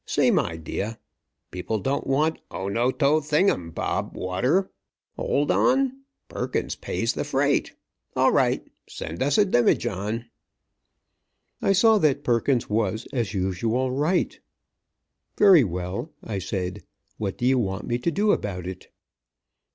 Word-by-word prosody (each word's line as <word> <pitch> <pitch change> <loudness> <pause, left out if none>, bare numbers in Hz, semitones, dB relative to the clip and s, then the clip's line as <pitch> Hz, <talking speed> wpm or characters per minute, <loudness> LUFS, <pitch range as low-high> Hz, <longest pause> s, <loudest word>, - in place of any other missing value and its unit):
Same - - +3
idea. 85 +7 -4 0.5
People 90 +4 -3
don't 135 +7 -2
want 155 +4 +1
O 95 - -5
no 120 +5 +1
to 145 +3 +2
thing 150 +6 +3
um 85 -2 -4
bob - - -3
water. 125 - 0 0.4
Hold 145 +1 0
on, 265 0 +2 0.3
'Perkins - - -3
pays - - -2
the - - -2
freight!' - - 0 0.4
All - - +4
right, - - +2 0.2
send - - -6
us - - +2
a 210 - +5
demijohn!" 115 - +1 1.4
I 195 - +3
saw 220 +2 +5
that 150 -6 +2
Perkins 120 +1 +1
was, 110 0 -1
as 115 -5 -1
usual, 110 +7 0
right. 150 +7 0 1.0
"Very 190 -8 +7
well," 90 - -4
I 105 -4 -4
said, 90 -1 -4 0.4
"what 100 -3 -3
do 120 - -2
you 130 0 +4
want 95 -4 -2
me 120 0 -1
to 125 - 0
do 205 +6 +2
about 90 - -2
it?" 90 0 -7
120 Hz, 135 wpm, -25 LUFS, 95-150 Hz, 1.4 s, Very